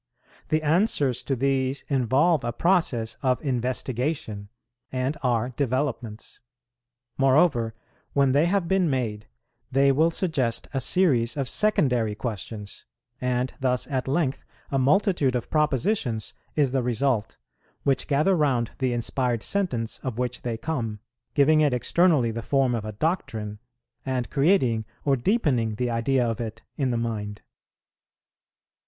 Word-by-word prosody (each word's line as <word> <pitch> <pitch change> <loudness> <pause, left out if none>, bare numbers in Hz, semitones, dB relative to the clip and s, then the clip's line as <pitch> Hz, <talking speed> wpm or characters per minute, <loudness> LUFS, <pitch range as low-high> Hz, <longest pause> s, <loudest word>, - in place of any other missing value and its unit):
The 155 0 +1
answers 150 - +2
to 135 - 0
these 135 +1 0
involve 135 +4 +2
a 120 - -1
process 120 -8 +1
of 130 -2 +1
investigation, 125 -3 -2 0.4
and 130 +3 -1
are 120 -2 +1
developments. 130 -4 -3 0.8
Moreover, 135 -5 +3 0.4
when 140 -2 +3
they 145 +5 +3
have 190 -1 +1
been 190 -2 +2
made, 115 -6 -2 0.4
they 135 +1 +4
will 155 +5 +3
suggest 145 -10 -1
a 135 - 0
series 130 -7 +2
of 135 -2 -1
secondary 125 - +2
questions; 105 -2 -6 0.4
and 125 0 0
thus 125 -2 +1
at 130 -1 -1
length 140 -1 0 0.3
a 135 - +1
multitude 145 -2 +2
of 120 - -3
propositions 150 - 0 0.2
is 145 -4 +2
the 135 -1 +1
result, 120 -1 0 0.5
which 135 -2 +1
gather 155 +7 +3
round 130 -8 +1
the 130 -2 +1
inspired 120 0 -1
sentence 125 - -2
of 125 -4 -5
which 125 0 -2
they 115 -2 -3
come, 115 -6 -3 0.4
giving 155 +2 +5
it 145 -4 +3
externally 150 -2 +3
the 115 +1 -4
form 135 +1 +1
of 115 -3 -2
a 110 - -4
doctrine, 110 - -2 0.4
and 130 -2 -2
creating 135 - +3 0.2
or 140 -2 +4
deepening 125 - +1
the 120 +2 -1
idea 120 +2 +1
of 115 +1 -2
it 115 0 -6
in 135 -3 0
the 120 - 0
mind. 105 -3 -4
130 Hz, 135 wpm, -25 LUFS, 115-145 Hz, 0.8 s, giving